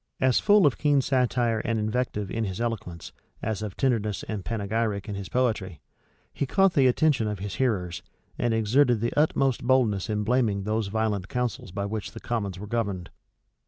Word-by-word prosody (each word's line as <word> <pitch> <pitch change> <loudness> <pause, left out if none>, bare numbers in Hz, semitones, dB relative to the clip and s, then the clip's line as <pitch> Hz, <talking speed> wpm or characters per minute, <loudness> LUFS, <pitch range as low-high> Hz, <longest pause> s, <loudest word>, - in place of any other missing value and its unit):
As 130 -1 +3
full 205 -2 +5
of 140 - +2
keen 145 -2 +3
satire 125 -3 +1
and 115 +1 -1
invective 105 -2 -2
in 115 - -1
his 95 -2 -4
eloquence, 110 -8 -4 0.3
as 110 -1 -2
of 105 -3 -5
tenderness 110 -6 0
and 105 -3 -5
panegyric 105 -1 -2
in 105 - -4
his 100 -1 -6
poetry, 110 -10 -1 0.5
he 140 - -2
caught 195 +4 +3
the 135 -5 +4
attention 130 -3 +2
of 105 -1 -2
his 100 +1 -5
hearers, 90 -8 0 0.3
and 120 - 0
exerted 115 +3 +3
the 115 +2 -1
utmost 135 -5 +2
boldness 120 -7 +2
in 105 -1 0
blaming 110 -4 +1
those 110 +1 -1
violent 105 -2 -1
counsels 125 -6 -3
by 100 +2 -3
which 105 0 -4
the - - -8
commons 100 -6 -3
were 100 - -7
governed. 100 -5 -3
110 Hz, 180 wpm, -26 LUFS, 100-125 Hz, 0.5 s, full